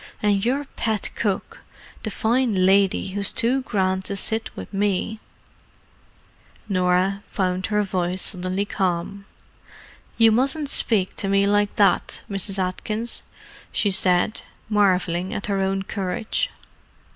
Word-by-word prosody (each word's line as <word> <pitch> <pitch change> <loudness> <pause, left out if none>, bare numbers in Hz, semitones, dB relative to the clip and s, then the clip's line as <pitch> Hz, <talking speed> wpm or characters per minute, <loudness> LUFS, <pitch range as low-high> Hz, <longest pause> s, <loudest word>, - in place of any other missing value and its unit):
"And 200 -2 +2
your 275 +4 0
pet 220 -5 -2
cook, 200 -4 -3 0.4
the 220 - -3
fine 220 -3 +1
lady 195 0 +3
who's 200 +1 +1
too 260 +2 +1
grand 190 -5 -1
to 200 - -2
sit 220 +3 -2
with - - -9
me——" 205 +2 -1 1.5
Norah 185 0 +1
found 185 -1 -1
her 210 -1 +1
voice 185 -1 -1
suddenly 185 +1 0
calm. 195 0 -2 0.9
"You 225 -1 +6
mustn't 275 +5 +1
speak 200 -5 +2
to 195 - -2
me 195 0 +3
like 205 0 +1
that, 200 -3 +2
Mrs. 195 0 +1
Atkins," 210 +5 0 0.5
she 205 - +1
said, 185 +2 +3 0.3
marvelling 190 -2 +1
at 200 - -3
her 200 -2 -1
own 195 0 0
courage. 195 - -2
200 Hz, 125 wpm, -23 LUFS, 185-215 Hz, 1.5 s, You